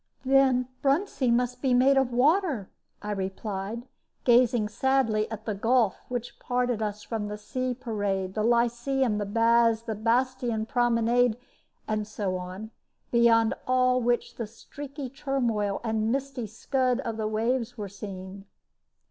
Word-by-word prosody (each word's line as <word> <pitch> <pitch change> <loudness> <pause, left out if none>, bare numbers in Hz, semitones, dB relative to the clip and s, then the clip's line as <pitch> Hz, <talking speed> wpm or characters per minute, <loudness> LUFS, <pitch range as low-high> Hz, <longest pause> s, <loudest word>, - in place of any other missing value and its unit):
"Then 260 -2 +4
Bruntsea 275 -3 +1
must 250 +1 0
be 260 -3 +2
made 265 +3 +5
of 265 -2 +2
water," 280 - +2 0.3
I 210 - -3
replied, 195 +3 -4 0.4
gazing 240 -3 +4
sadly 225 -2 +1
at 220 0 -7
the 215 - -1
gulf 225 0 +2
which 245 -1 -5
parted 245 -2 -1
us 210 -1 -3
from 220 -3 -3
the 210 0 -5
Sea 255 +4 -3
Parade, 205 -6 -2
the 215 - -1
Lyceum, 240 0 +1
and 200 -1 -4
Baths, 230 0 +3
the 225 -1 -3
Bastion 235 +1 0
Promenade, 240 -1 +2 0.5
and 215 -1 -1
so 205 -3 -3
on; 185 +4 -6 0.4
beyond 230 -1 +4
all 255 0 +3
which 240 0 0
the 230 - -3
streaky 275 +5 -8
turmoil 240 -7 -1
and 220 -1 0
misty 265 -3 -3
scud 255 +4 0
of 230 -4 -4
the 215 -1 -1
waves 235 +3 -1
were 205 -2 -4
seen. 195 0 -8
235 Hz, 140 wpm, -27 LUFS, 215-255 Hz, 0.5 s, made